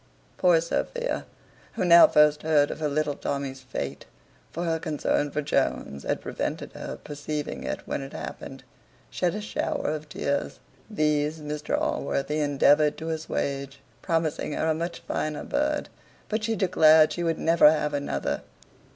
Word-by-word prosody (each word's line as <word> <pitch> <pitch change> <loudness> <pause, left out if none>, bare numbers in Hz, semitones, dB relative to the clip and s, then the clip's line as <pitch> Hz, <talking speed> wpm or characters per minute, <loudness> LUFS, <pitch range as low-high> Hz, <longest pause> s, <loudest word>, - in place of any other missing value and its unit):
Poor 175 -2 +5
Sophia, - - -2 0.5
who - - -1
now 170 -1 +9
first 150 0 +4
heard 150 -2 +3
of - - -6
her 155 - 0
little 150 0 0
Tommy's 140 -2 -4
fate 130 0 -5 0.4
(for 170 - -4
her 165 -1 0
concern 150 -1 0
for 150 +1 -2
Jones 70 - -1
had - - -2
prevented - - -4
her - - -6
perceiving 145 0 -5
it - - -3
when - - -2
it 135 - -8
happened), 80 -2 -7 0.5
shed 180 +1 0
a 210 - -4
shower 210 - -2
of 155 -1 -5
tears. 140 -1 -2 0.3
These 150 -5 +1
Mr 150 0 -2
Allworthy 145 +2 -1
endeavoured 145 +1 +3
to 160 +1 -5
assuage, 140 -3 -3 0.2
promising 165 -3 -1
her - - -1
a - - +3
much 170 +2 -4
finer 155 -1 -3
bird: 300 +1 -1 0.4
but 215 0 -1
she 225 +1 0
declared 160 -5 +5
she 175 - -3
would 165 -1 0
never 165 -2 +6
have 150 -1 -1
another. 145 0 -2
155 Hz, 155 wpm, -26 LUFS, 145-165 Hz, 0.5 s, now